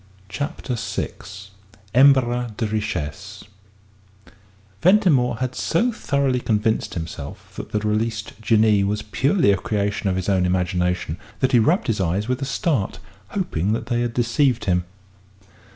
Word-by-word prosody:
CHAPTER 145 +3 -4
VI 110 -3 -3 0.8
EMBARRAS 125 -3 +4
DE 115 - -1
RICHESSES 105 -9 -4 1.4
Ventimore 165 - +4
had 130 0 -2
so 225 - +1
thoroughly 140 - 0
convinced 110 -1 0
himself 80 -4 -7
that - - -7
the - - 0
released 110 +1 -1
Jinnee 110 -2 +4
was 105 +2 -1
purely 135 - +2
a 100 - +2
creature 100 +1 -1
of 95 - 0
his 95 0 -3
own 95 -2 +2
imagination, 90 -2 0 0.2
that 130 0 +2
he 125 - +5
rubbed 160 - +2
his 110 -4 0
eyes 95 +4 0
with 130 +1 -1
a - - -1
start, 135 - -1 0.3
hoping 105 - -1
that 115 - -2
they 120 0 0
had 120 -1 -2
deceived 125 +1 +1
him. 90 -2 +1
110 Hz, 140 wpm, -22 LUFS, 100-130 Hz, 1.4 s, he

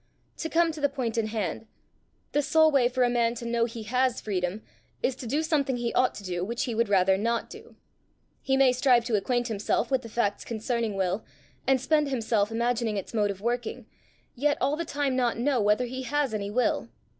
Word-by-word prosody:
To 320 - -3
come 330 0 +3
to 305 -1 -8
the 285 - +3
point 255 -5 -3
in 225 -2 0
hand: 215 -1 -3 0.6
the 290 - +2
sole 315 +2 +4
way 260 -4 +4
for 255 0 +1
a - - +4
man 235 -1 +1
to 235 - -7
know 235 0 +1
he 230 -1 -7
has 250 +2 +1
freedom 190 0 -3 0.4
is 260 - +1
to 245 - -7
do 290 +7 0
something 280 -5 +1
he 240 -1 -2
ought 255 0 +2
to 205 - -8
do, 175 -2 -3
which 235 +5 -2
he 240 - -2
would 230 -1 +1
rather 190 -1 +3
not 230 +2 -1
do. - - -12 0.7
He 265 0 +1
may 270 -1 +5
strive 250 -2 +3
to 230 - 0
acquaint 240 +4 0
himself 225 +2 -1
with 265 -2 +2
the 230 - -10
facts 215 -3 -1
concerning 230 -1 -2
will, 190 +2 -1 0.4
and 265 0 +4
spend 295 +3 +2
himself 225 -5 +1
imagining 235 -1 0
its 195 - -6
mode 210 -2 +2
of 195 -1 -5
working, 240 +1 -2 0.5
yet 290 +3 +1
all 280 +3 +1
the 335 +2 -3
time 285 -3 -1
not 245 -3 +1
know 250 0 +1
whether 210 +4 +2
he 260 +2 -5
has 270 0 -1
any 200 -1 -2
will." 245 +4 0
235 Hz, 215 wpm, -27 LUFS, 215-265 Hz, 0.7 s, may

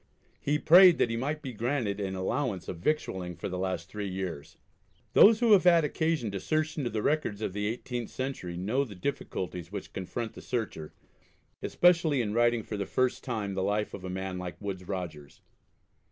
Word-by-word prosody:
He 145 +1 +1
prayed 175 +3 +8
that 115 - +2
he - - -1
might 150 +6 -2
be 130 -3 -5
granted 115 -3 -1
an 95 -2 -3
allowance 95 0 -2
of 85 - -5
victualling 95 - -1
for - - -5
the 90 -1 -4
last 95 -3 -2
three 105 -2 -5
years." 90 -6 -5 0.6
Those 215 +1 +8
who 235 -2 +4
have 200 -4 +7
had 170 -2 +6
occasion 155 -6 0
to 100 - -3
search 155 - -1
into 135 -6 -2
the 110 -2 -3
records 145 -9 0
of 110 - -3
the 105 +1 -1
18th 120 -3 -5
century 130 -10 -4
know 110 +10 0
the 110 -7 -9
difficulties 90 - -4
which 100 - -7
confront 110 +5 -4
the - - -10
searcher, 110 -11 -4 0.7
especially 165 -5 +3
in 105 -4 -1
writing 120 0 +3
for 105 - -5
the 100 -1 -3
first 130 -1 0
time 110 -6 -3
the 95 - -2
life 105 +2 -1
of 95 - -7
a 95 - -5
man 95 0 -4
like 90 -1 -6
Woodes 95 -3 -5
Rogers. 80 -7 -6
105 Hz, 195 wpm, -29 LUFS, 95-140 Hz, 0.7 s, prayed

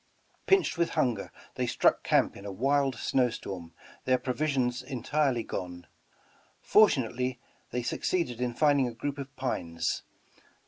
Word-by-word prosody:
Pinched 385 - +3
with 170 - +2
hunger, 120 -9 +1 0.2
they - - -2
struck - - +3
camp - - +2
in 100 - -10
a 100 - -5
wild 135 +5 +1
snow 125 +1 +1
storm, 90 -7 -7 0.3
their 130 0 +4
provisions 130 -2 0
entirely 130 0 0
gone. 90 -1 -6 0.7
Fortunately 130 - +3 0.3
they 125 0 -2
succeeded 125 -3 -1
in 120 -1 -1
finding 145 -2 +3
a 120 - -6
group 140 +4 -4
of 135 0 -7
pines. 85 -11 -2
125 Hz, 135 wpm, -29 LUFS, 115-140 Hz, 0.7 s, their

